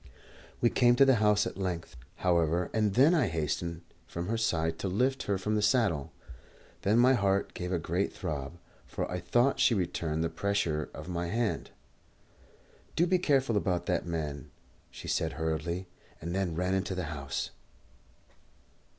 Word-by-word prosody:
We 120 - +4
came 120 -1 +4
to 135 - +6
the 135 -3 +5
house 105 -1 +4
at - - -5
length, 85 -4 -3 0.2
however, 85 -1 +1
and 105 -3 +1
then 140 +7 +6
I 155 - +3
hastened 85 +1 -2 0.2
from 85 +3 -5
her 115 - +1
side 80 -7 0
to - - -2
lift 130 +8 +1
her 100 - +2
from 105 +3 -2
the 105 - +2
saddle. 100 - +2 0.7
Then 105 +3 +2
my 125 +2 +6
heart 100 -4 +1
gave 90 0 -4
a 90 - +2
great 85 +4 -1
throb, 75 +2 -5 0.3
for - - -3
I 90 - -2
thought 125 +9 +2
she 135 -4 +4
returned 85 -4 -1
the 80 - 0
pressure 100 -7 -1
of - - -8
my 85 -1 -2
hand. 115 +3 -1 1.3
"Do 170 - +4
be 185 +1 +2
careful 135 -8 +2
about 90 -4 0
that - - -1
man," 75 -3 -4 0.4
she - - -10
said 80 0 0
hurriedly, 80 +3 -2 0.3
and 85 +2 -5
then 95 -4 -1
ran 90 +2 0
into 95 0 -1
the 90 - -2
house. 70 -2 -4
95 Hz, 170 wpm, -30 LUFS, 85-110 Hz, 1.3 s, to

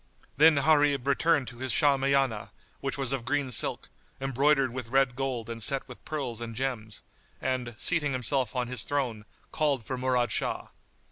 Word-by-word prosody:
Then 155 +3 +6
Gharib 145 -2 +3
returned 140 0 +2
to 120 0 -13
his 130 -1 -2
Shahmiyánah 135 -5 +2 0.3
which 135 0 -3
was 135 -2 -1
of 135 -3 -2
green 145 0 -1
silk, - - +1 0.3
embroidered 135 0 +2
with 125 -2 -5
red 135 0 +2
gold 130 -4 -3
and 115 -1 -6
set 135 +5 0
with - - -12
pearls 130 -7 -4
and 115 -1 -6
gems; 115 -5 -4 0.4
and, 125 -3 -2
seating 155 -1 +3
himself 130 0 0
on 125 -1 -1
his 125 -2 -2
throne, 125 -7 -2 0.3
called 140 -7 0
for 130 -1 -4
Murad 125 -1 +1
Shah. - - -2
130 Hz, 165 wpm, -28 LUFS, 120-140 Hz, 0.4 s, Then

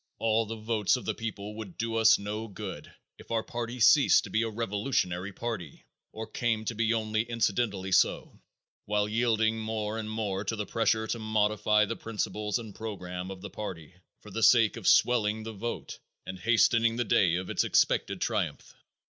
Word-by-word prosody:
All 115 0 +1
the 115 - -5
votes 110 -1 +1
of 125 - -6
the - - -1
people 105 -2 -6
would 105 -6 -8
do 115 0 -2
us 110 -1 +6
no 105 +2 -5
good 100 -1 -8 0.3
if - - -15
our 115 -1 0
party 120 +1 -5
ceased 140 +5 +6
to - - -9
be 110 - +2
a 115 - -1
revolutionary 105 -4 -2
party, 100 -9 -6 0.3
or 110 +1 -6
came 110 0 -1
to 115 - -2
be 115 0 0
only 110 -1 0
incidentally 110 -4 -1
so, - - +1 0.4
while 105 0 +1
yielding 110 0 +1
more 110 0 -3
and 110 -1 -5
more 105 -3 -2
to 110 +2 -2
the 105 -1 -3
pressure 110 +1 +1
to 115 - -3
modify 105 -1 +2
the 115 - -4
principles 105 -1 -3
and 110 -4 -8
program 90 -4 -6
of 95 -1 -8
the 100 -1 -8
party 90 -6 -7 0.3
for 105 - -13
the 115 - -3
sake 115 -1 +5
of - - -5
swelling 110 -3 +3
the 110 0 -6
vote 115 +3 -5 0.3
and 95 0 -7
hastening 115 +2 +3
the 120 - 0
day 95 -8 +3
of 90 +1 -3
its - - +1
expected - - +1
triumph. - - -2
110 Hz, 185 wpm, -29 LUFS, 105-115 Hz, 0.4 s, us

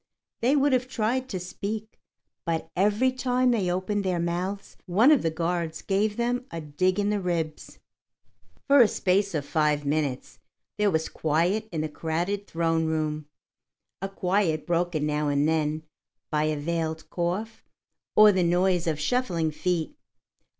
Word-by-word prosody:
They 255 +5 +3
would 285 -1 +3
have 255 0 +1
tried 255 +2 -1
to 190 - -3
speak, 210 +4 -6 0.4
but 165 -1 -3
every 210 +7 +3
time 255 0 +1
they 205 -7 +1
opened 190 +3 -1
their 185 -2 0
mouths, 180 +4 -3
one 215 +11 +5
of 300 - +5
the 165 - +1
guards 165 0 -2
gave 205 +2 0
them 245 +2 -1
a 165 - -5
dig 180 +6 0
in 205 0 +1
the 210 - 0
ribs. 170 -4 -3 0.9
For 280 -1 +6
a 230 - +7
space 195 -1 +1
of 145 -2 -2
five 150 -1 +1
minutes 140 -3 -2 0.4
there 210 -1 +4
was 160 -3 0
quiet 175 +8 0
in 160 -3 -2
the 155 - -1
crowded 170 +6 -3
throne 165 -1 0
room, 155 -1 -2 0.7
a 195 - -3
quiet 180 -4 0
broken 170 -3 0
now 150 0 0
and 145 +1 +2
then 155 -1 0 0.5
by 150 -1 +1
a 155 -1 0
veiled 160 0 -3
cough 185 +6 -3 0.5
or 215 0 +8
the 190 -2 +1
noise 175 0 +2
of 155 -2 0
shuffling 170 -5 0
feet. 175 - -2
175 Hz, 155 wpm, -26 LUFS, 160-210 Hz, 0.9 s, or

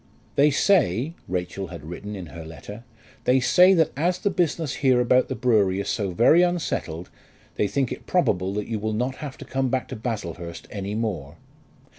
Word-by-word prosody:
"They 145 +2 +5
say," 145 - +2
Rachel 90 +1 -3
had 75 - -9
written 100 +6 -7
in 95 -3 -6
her 85 - -7
letter, 100 +8 -10 0.4
"they 130 +1 +4
say 180 +9 +6
that 160 -2 +3
as 175 +5 +1
the 200 - -1
business 165 -4 -1
here 130 -3 +4
about 125 +1 +3
the - - -3
brewery 105 -6 +2
is 100 - -3
so 100 -3 -1
very 120 - +5
unsettled, 160 - -1 0.4
they 105 - 0
think 130 +5 -1
it - - -7
probable 95 - +1
that 105 -1 -2
you 110 -2 -2
will 110 +1 -2
not 125 +4 -2
have 145 -3 -7
to - - -10
come 130 0 -1
back 130 0 -1
to - - -5
Baslehurst 90 -7 -5
any 100 0 -4
more." 90 -10 -3
115 Hz, 190 wpm, -24 LUFS, 95-140 Hz, 0.4 s, say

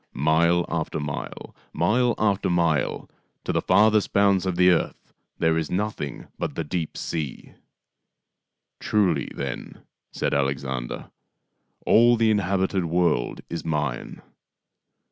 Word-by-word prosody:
" - - -48 0.2
Mile 85 +2 +3
after 80 -1 -2
mile, 75 0 -6 0.2
mile 120 +1 +2
after 100 -3 +1
mile, 85 -3 0 0.4
to - - -2
the - - +1
farthest 110 -1 +3
bounds 100 -2 +3
of 90 - -1
the 90 +1 +5
earth 85 - -2 0.2
there 80 0 +2
is 80 - -3
nothing 95 -7 -3
but - - -3
the - - -2
deep 80 0 -4
sea." 75 -5 -5 0.6
" - - -59
Truly, 90 -9 +1
then," 70 -2 -6 0.3
said - - -2
Alexander, 65 -3 -2 0.4
" 60 0 -40
all 120 +2 +6
the 115 -1 +3
inhabited 95 -2 0
world 85 -7 0
is 85 - -5
mine. 75 -6 -3
85 Hz, 130 wpm, -24 LUFS, 75-100 Hz, 0.6 s, all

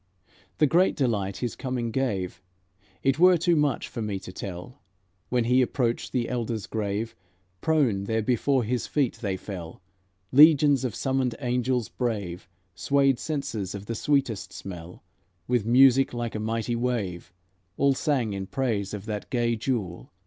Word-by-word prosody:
The 150 - +5
great 175 +6 +3
delight 105 -8 0
His 120 - -4
coming 125 -3 -3
gave, 100 -9 -2 0.6
It 135 +2 +2
were 180 0 +7
too 170 +1 +2
much 145 -4 +1
for 115 - -6
me 105 -2 -2
to 90 - -9
tell. 95 +6 -8 0.5
When 125 -1 +2
He 125 +3 +3
approached 120 -2 -1
the 120 -2 0
Elders 115 -3 -3
grave, 110 +1 -3 0.5
Prone 130 -12 +2
there 110 +1 0
before 125 +3 +2
His 120 +2 -2
feet 140 -5 0
they 100 -4 -1
fell; 90 -4 -8 0.5
Legions 145 -1 +6
of 125 -6 -2
summoned 130 -3 0
angels 125 -2 0
brave 100 -8 -4 0.2
Swayed 140 +4 +2
censers 135 - -3
of 100 0 -7
the 115 - -3
sweetest 135 -3 0
smell; 90 -2 -9 0.4
With 120 -3 +1
music 130 +1 +5
like 120 -1 -3
a 110 - -3
mighty 115 +2 -1
wave, 105 -8 -2 0.5
All 140 -1 +4
sang 130 -6 0
in 95 -1 -4
praise 110 -7 -1
of 100 0 -8
that 105 -2 -5
gay 120 -2 +1
Jewel. 110 -7 -3
120 Hz, 155 wpm, -26 LUFS, 105-135 Hz, 0.6 s, were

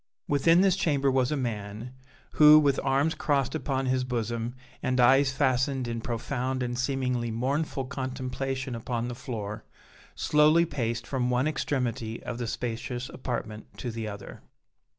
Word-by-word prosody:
Within 165 +5 +4
this 190 -2 +4
chamber 140 -6 +1
was 130 0 +2
a 150 - 0
man, 110 -1 -4 0.4
who, 150 0 +8
with 145 -3 +3
arms 140 +4 +2
crossed 140 -5 0
upon 135 -4 -1
his 130 0 +1
bosom 120 -1 -3 0.3
and 130 0 0
eyes 135 +3 +5
fastened 130 -1 +1
in 115 -1 -3
profound 125 +2 -2
and 120 0 -2
seemingly 125 -2 -1
mournful 135 +4 -1
contemplation 130 0 -4
upon 120 +1 -3
the - - -4
floor, 115 -4 -5 0.5
slowly 150 - +4
paced 120 -6 -2
from 125 -2 -1
one 125 +3 +2
extremity 125 -7 -2
of 120 -1 -5
the 120 - -2
spacious 120 +2 -4
apartment 110 -4 -5
to 120 - -4
the 110 -1 -4
other. 100 -1 -8
130 Hz, 150 wpm, -28 LUFS, 120-140 Hz, 0.5 s, who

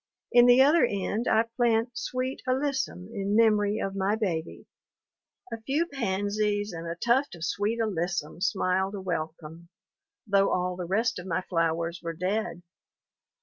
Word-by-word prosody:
In 245 0 +7
the 245 +2 +7
other 305 +4 +5
end 205 +3 -1
I 220 +1 +4
plant 230 0 +1
sweet 255 +2 -3
alyssum 260 -8 -1
in 200 -1 -1
memory 210 -2 +3
of 195 0 -3
my 195 +2 +1
baby. 175 -7 -3 0.9
A 225 - -6
few 280 +8 0
pansies 205 - -1
and 165 0 -6
a 165 - -3
tuft 240 +6 +1
of 170 -1 -5
sweet 205 +4 -1
alyssum 175 -6 -2
smiled 190 -1 0
a - - -5
welcome, 165 -2 -5 0.6
though 195 -2 +3
all 180 0 0
the 180 -1 -5
rest 225 +3 0
of 180 - -8
my 180 +1 0
flowers 165 -1 -1
were 165 -1 -4
dead. 185 +1 -2
200 Hz, 150 wpm, -27 LUFS, 180-230 Hz, 0.9 s, In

